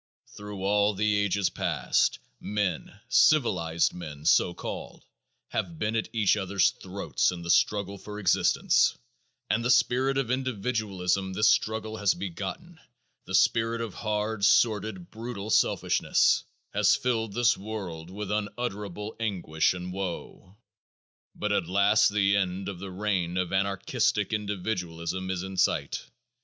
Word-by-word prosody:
Thru 105 -2 -8
all 105 +1 +2
the 105 +1 +1
ages 100 -1 +1
past - - +1 0.2
men, 100 -5 -3
civilized 90 - +3
men, 75 -4 -8
so 85 - +4
called, - - -7 0.4
have 85 -3 -3
been 105 +4 -1
at 115 - 0
each 110 -3 +3
other's 95 -2 +2
throats - - -1
in 85 -1 -7
the 85 - 0
struggle 100 0 +1
for 105 +2 -8
existence, 100 -4 +3 0.5
and 115 - 0
the 120 - 0
spirit 130 +2 +3
of 130 -3 0
individualism 100 -7 -1
this 105 +3 +4
struggle 110 0 0
has 100 -2 +2
begotten, 100 - -6 0.5
the 95 - -2
spirit 115 +4 +2
of 115 -4 -4
hard, 105 -1 -2
sordid, 105 -4 +2
brutal 110 -2 -6
selfishness, - - +2 0.3
has - - +4
filled 115 -4 -1
this 120 +1 +3
world 95 -6 -6
with 105 +2 -5
unutterable 105 -1 -4
anguish 90 -7 0
and 90 0 -6
woe. 95 +1 -6 0.8
But 105 - -2
at 95 -5 +1
last 100 +3 +4
the 100 -1 +2
end 95 0 -1
of 95 -3 -7
the 100 +1 -6
reign 95 -2 -1
of 90 -1 -1
anarchistic 100 +3 0
individualism 95 -4 -3
is 95 -1 -2
in 95 0 -7
sight. 90 - 0
100 Hz, 135 wpm, -27 LUFS, 95-110 Hz, 0.8 s, so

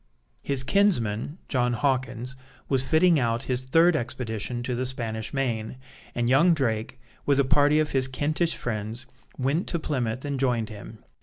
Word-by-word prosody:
His 135 - -2
kinsman, 145 - +1
John 125 -2 +1
Hawkins, 130 -1 -1 0.3
was 135 -1 +3
fitting 165 +1 +4
out 115 -2 0
his 130 0 -1
third 165 +5 +4
expedition 120 -2 -3
to 125 - -2
the 125 +1 -1
Spanish 115 -4 -4
Main, 125 -4 -2 0.4
and 120 0 0
young 155 +7 +5
Drake, 115 -4 -2 0.3
with 140 -1 +3
a 140 - +4
party 145 +3 +4
of 155 -1 0
his 130 -1 +1
Kentish 155 +5 0
friends, 110 +1 -4 0.3
went 140 +7 0
to 170 - 0
Plymouth 130 -5 -2
and 140 -2 -2
joined 120 -4 0
him. 110 +1 -11
130 Hz, 160 wpm, -26 LUFS, 120-145 Hz, 0.4 s, young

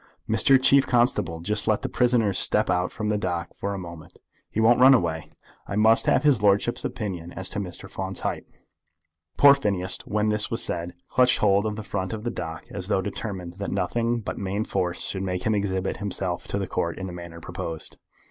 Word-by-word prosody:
Mr. 135 -1 +4
Chief 135 +1 +4
Constable, 120 -10 +1
just 105 +4 -2
let 105 -2 +1
the - - -1
prisoner 120 -5 +2
step - - +3
out 90 +1 0
from 105 -1 -3
the 105 -1 0
dock 85 -3 -3
for 100 0 -4
a - - -5
moment. 85 -3 -10 0.3
He - - -3
won't 115 +2 +5
run 130 +1 +8
away. 80 -7 -2 0.4
I 100 - -4
must 110 +2 +4
have - - +3
his 140 -7 +3
lordship's 105 +3 +2
opinion 95 -8 -5
as 95 - 0
to - - -3
Mr. 95 0 -6
Finn's 95 0 -5
height." - - -3 0.9
Poor 140 -1 +8
Phineas, 100 -9 +1
when 105 +1 0
this 105 0 +1
was 115 - 0
said, 85 0 -3
clutched 125 -1 +3
hold 100 0 +2
of 105 - -3
the 110 - -6
front 100 -1 -3
of 110 -1 -6
the 120 - -2
dock, 80 -7 -6
as 95 -2 -4
though 95 -2 +1
determined 90 -4 -6
that 100 - -3
nothing 115 +5 -1
but - - -5
main 100 +2 -2
force 90 -4 -2
should 95 - -3
make 90 -1 -3
him 110 - +1
exhibit 95 -2 -1
himself 95 -3 -3
to - - -2
the 100 - -2
Court 85 -2 -2
in 95 - -5
the 90 - -6
manner 85 -1 -9
proposed. 85 -2 -6
100 Hz, 210 wpm, -25 LUFS, 90-110 Hz, 0.9 s, run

